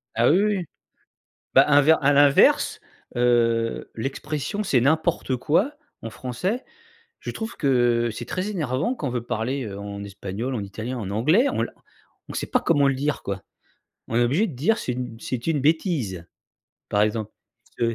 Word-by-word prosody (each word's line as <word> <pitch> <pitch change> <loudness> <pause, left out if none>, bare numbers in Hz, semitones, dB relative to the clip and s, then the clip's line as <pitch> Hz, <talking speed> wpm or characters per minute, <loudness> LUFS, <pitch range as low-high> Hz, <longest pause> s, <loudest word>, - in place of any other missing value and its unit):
Ah, 120 +2 +4
oui, 180 +6 +4
oui. 200 -5 0 0.9
Bah, 135 - +8
inver 145 +2 +6
à 145 +1 +4
l'inverse, 140 0 +4 0.4
heu, 115 -2 +1
l'expression: 145 - -3
«C'est 130 - +2
n'importe 145 -1 +1
quoi» 175 - +1 0.3
en 115 - -5
français, 180 - -3 0.6
je - - -5
trouve 225 +1 -6
que, 120 -4 +2
c'est 120 - -6
très 185 +3 -3
énervant 160 - -1
quand 150 - -5
on - - -3
veut 120 -1 -2
parler 120 0 -2
en 100 0 -6
espagnol, 100 +6 -5
en 110 - -2
italien, 110 +6 -5
en 100 -3 -5
anglais, 155 - +3
on - - 0
la - - -4 0.6
on - - -7
sait - - -2
pas 250 - +1
comment 145 - +3
le 135 - +1
dire 145 +2 -2
quoi. 100 -1 -4 0.7
On 115 - -4
est 120 - +4
obligé 150 - +2
de 165 - -7
dire 200 - +2
c'est 125 - -3
une 120 -2 -6
c'est 125 +1 -4
une 155 -4 +1
bêtise, 140 - 0 0.6
par 105 0 +2
exemple. 110 0 -1 0.5
«It's 115 - +3
130 Hz, 175 wpm, -24 LUFS, 115-160 Hz, 0.9 s, Bah